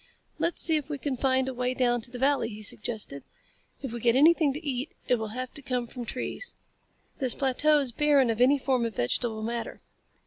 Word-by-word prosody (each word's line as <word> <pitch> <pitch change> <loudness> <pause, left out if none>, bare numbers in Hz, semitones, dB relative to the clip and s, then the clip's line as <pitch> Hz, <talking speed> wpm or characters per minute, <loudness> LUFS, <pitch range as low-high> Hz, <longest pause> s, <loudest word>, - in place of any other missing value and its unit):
"Let's 340 - +1
see 320 -2 +4
if 295 -1 -5
we 295 - -3
can 280 -1 -2
find 260 0 +1
a 265 - -3
way 250 +1 -1
down 245 -2 +2
to 235 - -7
the 250 - -7
valley," 275 -1 +2
he 215 -1 -8
suggested. 210 - -4 0.6
"If 260 -4 -4
we 240 - -4
get 235 +1 +3
anything 310 +1 +5
to 300 +4 -7
eat 265 +1 -3
it 245 - +2
will 220 - -3
have 255 0 -4
to 285 - -7
come 250 -3 -2
from 240 0 -7
trees. 255 - -3 0.6
This 260 -3 +2
plateau 290 +3 +3
is 275 -4 0
barren 280 -2 +3
of 225 +1 -2
any 270 +3 +5
form 260 -2 0
of 230 -3 -3
vegetable 220 - 0
matter." 235 +1 -4
255 Hz, 215 wpm, -28 LUFS, 235-280 Hz, 0.6 s, anything